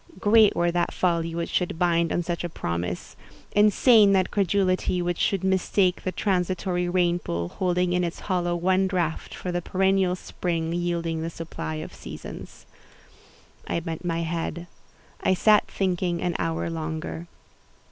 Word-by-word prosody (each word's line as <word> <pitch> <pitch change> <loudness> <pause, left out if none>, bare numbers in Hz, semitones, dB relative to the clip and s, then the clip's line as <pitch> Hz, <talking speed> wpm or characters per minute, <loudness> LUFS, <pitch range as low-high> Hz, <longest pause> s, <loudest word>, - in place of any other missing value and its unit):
Great 215 +1 +5
were 175 0 +2
that 175 0 0
folly 165 -2 0
which 170 0 -3
should 180 -3 -1
build 170 -1 +2
on 175 - 0
such 170 0 -3
a 175 - -3
promise—insane 200 - +2
that 190 -1 +2
credulity 185 -2 +1
which 175 -1 -1
should 195 -2 +1
mistake 190 0 +2
the 185 - -2
transitory 180 -2 -1
rain 175 -1 +2
pool, 85 - -3
holding 180 - 0
in 180 0 +1
its 170 -1 -4
hollow 175 -2 0
one 185 +2 +2
draught, 175 -4 -2
for 180 - -4
the 175 0 -1
perennial 190 0 +1
spring 170 -2 -3
yielding 170 -2 -1
the 165 - -3
supply 165 -1 -6
of 155 - -6
seasons." - - -9 1.0
I - - 0
bent 165 0 -6
my 170 -1 -1
head: 170 +1 -3 0.6
I 190 - +2
sat 210 +3 +4
thinking 180 -2 -1
an 175 -1 -1
hour 165 0 -1
longer. 160 +1 -4
175 Hz, 150 wpm, -25 LUFS, 165-185 Hz, 1.0 s, Great